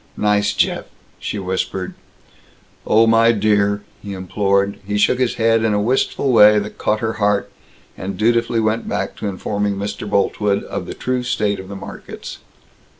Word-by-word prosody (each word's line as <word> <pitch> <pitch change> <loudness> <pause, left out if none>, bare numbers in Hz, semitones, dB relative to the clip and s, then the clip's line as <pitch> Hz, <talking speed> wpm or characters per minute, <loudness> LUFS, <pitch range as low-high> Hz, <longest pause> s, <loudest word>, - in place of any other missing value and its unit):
"Nice 105 -1 +2
Jeff!" - - 0 0.3
she - - -4
whispered. 95 -1 -3 0.9
"Oh, 110 +1 +5
my 115 +1 +5
dear!" 100 -1 +1 0.2
he 100 -1 -6
implored. 100 +1 0
He 105 +1 -2
shook 115 +4 +3
his 125 -2 +1
head 115 0 +2
in 110 -2 +2
a - - +2
wistful 130 +4 +1
way 105 -1 +7
that 105 0 -4
caught 105 0 0
her 110 -1 -1
heart, 105 0 +1 0.4
and 95 +1 -5
dutifully 115 +1 +2
went 110 +1 0
back - - -2
to - - -4
informing 100 +1 -2
Mr. 100 +1 -5
Boltwood 100 0 +1
of - - -5
the - - -6
true 125 0 -1
state 105 -5 -1
of 95 0 -9
the 100 - -6
markets. 95 0 -9
105 Hz, 165 wpm, -19 LUFS, 100-115 Hz, 0.9 s, way